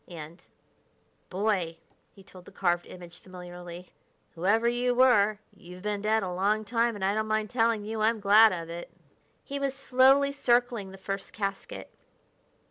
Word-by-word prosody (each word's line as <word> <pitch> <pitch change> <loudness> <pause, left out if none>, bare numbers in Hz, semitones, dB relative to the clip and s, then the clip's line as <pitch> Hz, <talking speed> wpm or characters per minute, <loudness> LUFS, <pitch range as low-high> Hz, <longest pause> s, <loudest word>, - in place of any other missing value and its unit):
And, 170 +1 -10 0.9
"Boy," 185 -4 -1 0.3
he 195 - -18
told 185 -1 -15
the - - -14
carved 175 -3 -1
image 175 -1 -12
familiarly, 180 -1 -11 0.4
"whoever 205 +7 +1
you 245 +1 +1
were, 215 -5 +4 0.2
you've 180 +1 -13
been 210 -1 -2
dead 220 +1 +1
a 180 -1 -4
long 210 +4 0
time, 230 +1 0
and 195 -2 -3
I 195 - +1
don't 215 +1 -1
mind 215 -1 -1
telling 230 -3 +1
you 220 0 -4
I'm 220 +1 +2
glad 210 +2 +6
of 170 -2 -5
it." 170 +1 -8 0.5
He 280 0 -5
was 275 -1 -2
slowly 275 +1 +4
circling 240 -6 0
the 195 - -11
first 195 +1 -6
casket. 200 - -5
205 Hz, 160 wpm, -28 LUFS, 180-230 Hz, 0.9 s, glad